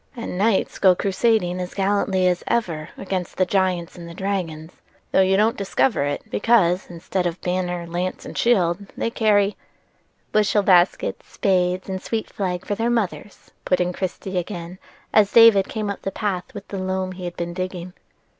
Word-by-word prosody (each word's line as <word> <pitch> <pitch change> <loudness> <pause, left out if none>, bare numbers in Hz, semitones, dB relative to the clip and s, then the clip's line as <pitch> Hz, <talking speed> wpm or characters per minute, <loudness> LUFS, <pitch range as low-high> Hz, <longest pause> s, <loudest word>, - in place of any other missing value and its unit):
"And 235 -6 -5
knights 200 +1 +1
go 185 -2 +6
crusading 195 -2 +1
as 180 - -6
gallantly 195 -1 +1
as 180 -1 0
ever 170 -10 -1
against 185 -2 -4
the 185 - +3
giants 180 -2 0
and 170 -2 -9
the 170 - -10
dragons, 180 -5 -4 0.3
though - - +4
you 190 0 +3
don't 220 +3 +3
discover 200 - +1
it, 145 0 -3
because, 190 -6 +2
instead 175 +1 -2
of 175 +1 -4
banner, 180 -1 -2
lance, 175 +2 -3
and - - -8
shield 195 -4 +2
they 230 - -1
carry"— 210 -3 +2 0.8
"Bushel 210 -1 +3
baskets, 180 -2 +2
spades, 185 -3 +1
and 190 -1 -4
sweet 225 -1 -3
flag 180 -3 -3
for - - -2
their 225 +3 0
mothers," 215 -3 -3
put 180 - +1
in 180 0 0
Christie 185 0 -3
again, 175 0 -7 0.3
as 205 -2 +5
David 225 -4 +7
came 215 -2 -3
up 200 - -7
the - - -2
path 195 -2 -3
with 200 0 -8
the 195 - -4
loam 185 0 -2
he 185 -1 -7
had 175 - -6
been 170 0 -3
digging. 185 -1 -5
185 Hz, 175 wpm, -22 LUFS, 180-205 Hz, 0.8 s, David